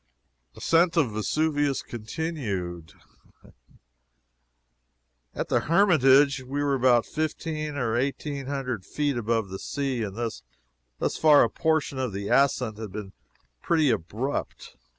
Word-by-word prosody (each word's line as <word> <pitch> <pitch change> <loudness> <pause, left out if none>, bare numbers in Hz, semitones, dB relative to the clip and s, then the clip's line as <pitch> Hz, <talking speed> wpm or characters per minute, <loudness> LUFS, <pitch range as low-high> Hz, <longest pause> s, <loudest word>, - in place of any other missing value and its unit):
ASCENT 170 +1 +2
OF 140 -9 +3
VESUVIUS 145 +6 0
CONTINUED. 105 - -5 2.4
At - - -3
the - - +3
Hermitage 145 -7 +4
we 140 +3 -3
were 140 -1 +1
about 125 -3 +3
fifteen 155 -1 -3
or 120 -5 -1
eighteen 140 +2 -2
hundred 130 -7 -3
feet 145 +6 -1
above 115 -3 -1
the 95 0 -6
sea, 135 -4 -2
and 100 -3 -4
thus 115 -1 -4 0.8
far 150 -2 +6
a - - 0
portion 160 -4 0
of 125 -5 -2
the 100 +1 -4
ascent 125 -5 +2
had 110 -3 -6
been 100 -1 -7 0.5
pretty 155 -5 +2
abrupt. 110 - -4
135 Hz, 120 wpm, -26 LUFS, 110-150 Hz, 2.4 s, far